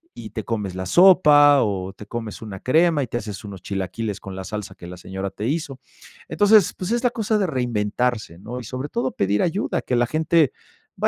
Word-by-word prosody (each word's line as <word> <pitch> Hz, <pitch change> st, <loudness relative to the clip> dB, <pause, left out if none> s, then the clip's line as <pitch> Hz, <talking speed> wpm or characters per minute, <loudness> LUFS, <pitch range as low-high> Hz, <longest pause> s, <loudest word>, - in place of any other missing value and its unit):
y 110 Hz, -, -8 dB
te 110 Hz, 0 st, -5 dB
comes 105 Hz, -5 st, -3 dB
la 95 Hz, 0 st, -4 dB
sopa, 145 Hz, -, +6 dB
o 95 Hz, -3 st, -2 dB
te 105 Hz, -, -12 dB
comes 115 Hz, -2 st, -6 dB
una 100 Hz, -4 st, -7 dB
crema 160 Hz, +2 st, +3 dB
y -, -, -5 dB
te 120 Hz, -, -3 dB
haces 105 Hz, -4 st, -7 dB
1 95 Hz, -3 st, -9 dB
chilaquiles 100 Hz, +2 st, -4 dB
con 95 Hz, -1 st, -8 dB
la 95 Hz, -, -5 dB
salsa 105 Hz, -2 st, -6 dB
que 85 Hz, -, -11 dB
la 90 Hz, -, -8 dB
señora 95 Hz, +2 st, -5 dB
te 105 Hz, -, -6 dB
hizo. 145 Hz, -3 st, -3 dB, 0.5 s
Entonces, 205 Hz, -2 st, +4 dB
pues 185 Hz, +3 st, -5 dB
es 240 Hz, +1 st, 0 dB
la 245 Hz, -, +4 dB
cosa 220 Hz, -2 st, 0 dB
de 195 Hz, -3 st, +1 dB
reinventarse, 120 Hz, -, -2 dB
¿no? 120 Hz, +6 st, -7 dB
Y -, -, -8 dB
sobre 130 Hz, +5 st, -5 dB
todo 130 Hz, 0 st, -1 dB
pedir 100 Hz, +1 st, 0 dB
ayuda, 180 Hz, +4 st, -1 dB
que 125 Hz, -, -2 dB
la 120 Hz, -, +2 dB
gente 155 Hz, 0 st, +2 dB, 0.5 s
va -, -, +4 dB
120 Hz, 215 wpm, -22 LUFS, 100-150 Hz, 0.5 s, sopa